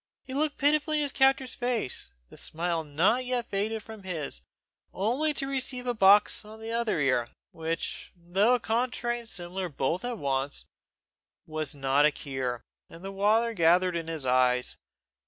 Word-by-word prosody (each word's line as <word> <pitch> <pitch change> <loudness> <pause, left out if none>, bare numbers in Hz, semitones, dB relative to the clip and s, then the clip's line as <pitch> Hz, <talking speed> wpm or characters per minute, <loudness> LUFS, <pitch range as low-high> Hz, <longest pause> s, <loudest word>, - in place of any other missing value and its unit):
He 260 - -8
looked 295 +2 0
pitifully 305 +2 +3
in 300 - +1
his 285 - -1
captor's 265 -2 +3
face, 240 - -2 0.2
the - - -13
smile 165 0 -2
not 170 - +2
yet 250 -2 -2
faded 215 +2 -1
from 220 -2 -10
his, 160 - -5 0.5
only 250 +11 0
to 270 - -1
receive 260 -2 -1
a 245 - 0
box 205 -1 +5
on 215 +1 -12
the 225 +1 -6
other 230 -6 0
ear, 130 -4 +1 0.2
which, 165 +1 -4
though 190 +7 +2
a - - -1
contrary 240 +1 -1
and 230 -1 -11
similar 180 0 -4
both 155 - -1
at 245 -1 -3
once, 140 -3 -2 0.8
was 155 -2 -3
not 140 +1 +3
a - - +1
cure, 130 -4 -4 0.3
and 165 +2 -12
the 195 - -5
water 215 +4 +2
gathered 180 0 +3
in 165 -1 -3
his 160 -4 -4
eyes. 125 0 +2
195 Hz, 170 wpm, -28 LUFS, 155-240 Hz, 0.8 s, box